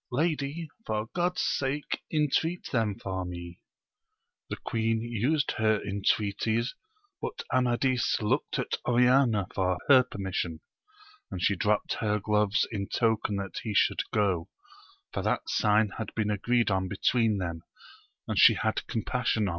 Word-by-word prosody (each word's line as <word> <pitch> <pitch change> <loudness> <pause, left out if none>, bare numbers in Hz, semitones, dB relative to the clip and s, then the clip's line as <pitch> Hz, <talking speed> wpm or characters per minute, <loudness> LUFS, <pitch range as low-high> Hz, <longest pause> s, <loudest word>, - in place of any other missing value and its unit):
Lady, 155 +2 -1 0.2
for 110 - -3
God's 175 +1 0
sake 140 +2 -1
intreat 160 +3 0
them 110 -5 0
for 95 -1 -4
me! 85 -1 -7 0.9
The - - -2
queen 115 0 -1
used 120 +6 0
her 110 -1 +3
intreaties, 105 +3 0 0.5
but - - -4
Amadis 125 0 +2
looked 125 +8 0
at 125 - -2
Oriana 125 -3 +4
for 90 -1 0
her 130 -2 +9
permission; 95 -8 -4 0.7
and 90 - -5
she 100 +3 +2
dropt 105 +3 0
her 105 -1 0
gloves 105 0 +1
in 100 -3 -3
token 110 -3 +1
that 100 -3 -4
he 110 -3 -4
should - - +3
go, 95 -6 +1 0.6
for - - -2
that - - -1
sign 105 0 +3
had 110 - -4
been 105 -1 0
agreed 120 +2 +1
on 95 -1 0
between 110 +2 +1
them, 85 -3 -4 0.7
and - - 0
she - - +8
hsA - - 0
(iOTCL 110 - -3
^^wci 120 -3 0
otv. - - 0
110 Hz, 145 wpm, -28 LUFS, 100-125 Hz, 0.9 s, her